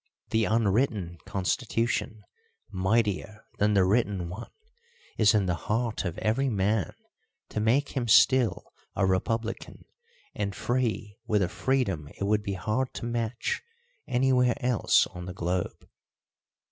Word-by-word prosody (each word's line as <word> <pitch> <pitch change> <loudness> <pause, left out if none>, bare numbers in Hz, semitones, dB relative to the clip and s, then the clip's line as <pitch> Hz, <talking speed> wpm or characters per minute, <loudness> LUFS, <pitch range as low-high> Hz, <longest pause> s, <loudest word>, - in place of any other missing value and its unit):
Theunwritten 110 -4 +1
constitution, 110 +2 -1 0.5
mightier 105 +1 0
than 105 0 +3
the 95 -2 +5
written 100 -4 +1
one, 100 +7 -7 0.7
is 110 0 +4
in 100 -2 +3
the 90 - +1 0.2
heart 110 -1 0
of 85 -2 -3
every 130 +6 +1
man 100 -3 0 0.5
to - - -3
make 120 +7 +2
him 125 -3 -2
still 120 +3 +4 0.2
a 100 - +2
republican 115 +5 -2 0.5
and 100 -2 -3
free 115 -4 -2
with 105 -2 +2
a 90 - -1
freedom 95 - -1
it - - -4
would 105 +1 +2
be 100 -1 -3
hard 110 +7 -1
to - - -5
match 120 0 -2 0.5
anywhere 125 -1 +3
else 125 -3 +3
on 90 0 -9
the 90 - -6
globe. 90 0 -3
105 Hz, 130 wpm, -28 LUFS, 95-120 Hz, 0.7 s, the